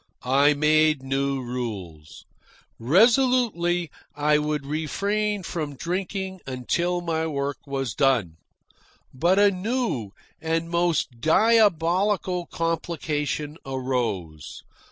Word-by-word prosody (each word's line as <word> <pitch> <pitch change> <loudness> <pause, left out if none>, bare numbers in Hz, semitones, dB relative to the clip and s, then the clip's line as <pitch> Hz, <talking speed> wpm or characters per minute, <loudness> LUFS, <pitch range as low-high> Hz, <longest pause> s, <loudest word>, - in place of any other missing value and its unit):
I 140 +4 +4
made 155 -1 +3
new 135 0 -1
rules. 100 -11 -6 0.5
Resolutely 190 - +3 0.2
I 150 +1 +2
would 150 -2 -2
refrain 200 +7 -1
from 155 -4 -4
drinking 190 +4 -4
until 170 +8 -1
my 160 -2 -1
work 140 -2 -2
was 135 -3 -3
done. 120 - +1 0.8
But 170 +8 +2
a 205 0 +5
new 200 - -2 0.3
and 165 +1 -1
most 170 -8 0
diabolical 185 - +2
complication 155 -3 -3
arose. 120 - -3
155 Hz, 95 wpm, -24 LUFS, 135-180 Hz, 0.8 s, a